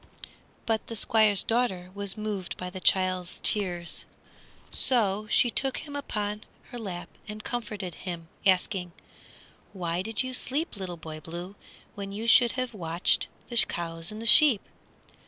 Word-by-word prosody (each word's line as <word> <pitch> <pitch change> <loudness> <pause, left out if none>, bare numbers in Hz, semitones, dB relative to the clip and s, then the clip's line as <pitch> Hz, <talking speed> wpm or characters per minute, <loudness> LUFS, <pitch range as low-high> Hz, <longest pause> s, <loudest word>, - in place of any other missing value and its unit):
But 225 -1 0
the 230 - -5
Squire's 215 -2 +4
daughter 195 -7 0
was 200 +1 -4
moved 210 -4 -4
by 180 0 -5
the 185 - -6
child's 185 -1 +2
tears, 175 -5 +1 0.7
so 215 -4 +2
she 240 - +4
took 270 +2 0
him 290 -2 -7
upon 210 -7 -2 0.3
her 245 - -6
lap 185 -5 -5 0.2
and 210 0 -7
comforted 210 -7 -4
him, 170 -2 -6 0.2
asking, 185 -2 +1 0.8
"Why 175 -2 -2
did 225 +5 -1
you 255 0 -4
sleep, 280 +5 0
Little 185 -3 -5
Boy 155 -1 -8
Blue, 175 +4 -7 0.4
when 200 -1 -6
you 215 +3 -4
should 235 0 +6
have 255 -2 -2
watched 170 -3 +1 0.2
the 240 - -2
cows 165 -4 +1
and 215 - -7
the 225 - -6
sheep?" 235 -2 +7
200 Hz, 150 wpm, -28 LUFS, 180-230 Hz, 0.8 s, sheep